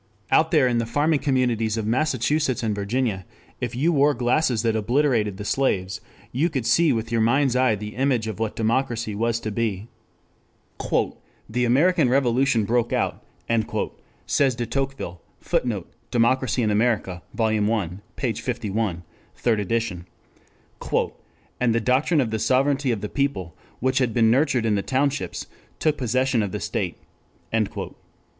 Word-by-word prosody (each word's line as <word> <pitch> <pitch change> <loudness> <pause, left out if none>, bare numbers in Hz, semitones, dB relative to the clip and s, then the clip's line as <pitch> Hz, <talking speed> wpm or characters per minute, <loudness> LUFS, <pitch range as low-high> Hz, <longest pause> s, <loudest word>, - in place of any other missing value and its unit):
Out 160 - +4
there 150 -6 +4
in 120 -1 +1
the 115 - -2
farming 145 +5 +2
communities 120 -6 +1
of 110 - -2
Massachusetts 130 +1 +1
and 110 -2 0
Virginia, 100 0 -1 0.4
if 120 -1 -3
you 160 +7 +2
wore 145 0 +4
glasses 120 -1 +1
that 115 -1 +1
obliterated 115 -3 +1
the 105 - -6
slaves, 100 -8 0 0.3
you 150 +8 +1
could 135 -7 -3
see 165 +4 +4
with 115 0 -2
your 115 -1 +2
mind's 125 +3 +3
eye 125 -3 +3
the 105 +1 -7
image 130 -3 +1
of 110 -2 -5
what 110 -1 -2
democracy 115 -1 0
was 115 +2 0
to 110 - -3
be. 110 -1 -2 1.6
"The 125 +3 0
American 150 +4 +3
Revolution 125 -3 +2
broke 120 +2 +1
out," - - -1 1.0
says 135 -4 +2
de 120 0 -2
Tocqueville, 135 -8 -3 0.2
[Footnote: 105 -8 -2 0.2
Democracy 125 +1 +2
in 105 - +1
America, 105 -5 0
Vol. 110 -2 +1
I, 105 -7 0 0.3
p. 125 -5 -1
51. 110 -7 -2 0.3
Third 115 -3 +1
Edition] 105 -4 -2 1.5
"and 120 -2 +2
the - - +3
doctrine 135 +7 +2
of 115 -4 -2
the 110 - -1
sovereignty 135 +3 +2
of 110 -4 -2
the 105 - -3
people, 105 - -2 0.2
which 130 +1 +1
had 125 -3 0
been 115 -2 +4
nurtured 130 -2 +2
in 110 - +2
the 100 - +1
townships, 140 +4 -1 0.3
took 155 -1 +1
possession 130 0 +1
of 100 -3 -2
the - - -3
state." - - -3
120 Hz, 150 wpm, -24 LUFS, 110-135 Hz, 1.6 s, Out